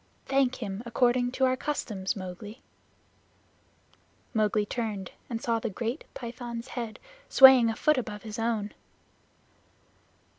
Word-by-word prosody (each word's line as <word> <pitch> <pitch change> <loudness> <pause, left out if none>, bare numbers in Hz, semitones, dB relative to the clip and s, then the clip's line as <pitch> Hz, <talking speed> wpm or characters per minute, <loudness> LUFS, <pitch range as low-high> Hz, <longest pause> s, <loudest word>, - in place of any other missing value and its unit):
Thank 270 -2 +2
him 195 0 -4
according 245 +1 +2
to 265 - +2
our 255 0 +2
customs, 215 -9 -3
Mowgli." 200 +4 -8 1.7
Mowgli 215 -2 +2
turned 210 -4 -4 0.2
and 230 -2 -3
saw 230 -1 0
the 230 - -3
great 230 - -4
Python's 235 0 -6
head 235 -4 -5 0.3
swaying 265 -3 +8
a 225 - -2
foot 305 +3 +3
above 210 -4 -6
his 215 0 -6
own. 225 -2 -1
230 Hz, 120 wpm, -28 LUFS, 210-250 Hz, 1.7 s, swaying